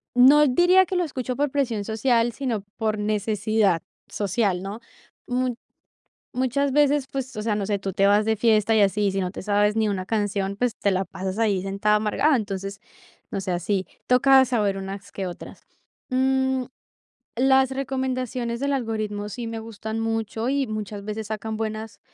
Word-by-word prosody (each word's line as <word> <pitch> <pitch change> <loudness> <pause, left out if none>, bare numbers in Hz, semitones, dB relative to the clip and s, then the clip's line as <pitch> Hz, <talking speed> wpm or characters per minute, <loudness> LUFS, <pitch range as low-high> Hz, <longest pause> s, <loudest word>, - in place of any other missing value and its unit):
no 275 +4 +7
diría 355 +8 +5
que 370 - -4
lo 360 - +2
escucho 255 -4 -4
por 290 +2 0
presión 245 -7 0
social, 230 +1 +1
sino 240 -7 -2
por 215 -2 -1
necesidad 210 -3 +1 0.3
social, 200 -2 0
¿no? 200 +3 -6 0.5
Mut 250 0 0 0.8
muchas 260 +2 +1
veces, 290 0 +3
pues, 265 -1 -4
o 215 - -3
sea, 215 -1 0
no 205 - -1
sé, 205 0 0
tú 195 0 -4
te 195 +2 +3
vas 205 +1 +4
de 220 +1 +2
fiesta 220 0 +3
y - - +5
así, 200 0 +2
sí 195 - -1
no 180 -1 -2
te - - -8
sabes 205 +1 +2
ni 220 -1 +2
una 190 -2 -2
canción, 200 -2 -1
pues, 245 +2 0
te 200 - +1
la 190 +1 0
pasas 190 +2 -5
ahí 205 -5 +1
sentada 200 +2 +1
amargada, 220 +8 +2
entonces, 195 -2 -4 0.5
no - - -2
sé, 190 -1 -3
así 185 +2 -1 0.2
toca 265 +1 +6
saber 215 -6 0
unas 195 +1 -7
que 195 - -4
otras. 175 - -10 0.5
Mm, 265 0 +1 0.7
las 265 +1 +4
recomendaciones 255 -3 -2
del 280 +1 0
algoritmo 215 -5 -2
sí 235 +2 -5
me 225 0 -5
gustan 220 0 -6
mucho, 225 +1 -2
y 275 -1 0
muchas 210 -2 -5
veces 215 0 -4
sacan 220 0 -4
buenas 220 0 -5
220 Hz, 175 wpm, -24 LUFS, 205-255 Hz, 0.8 s, no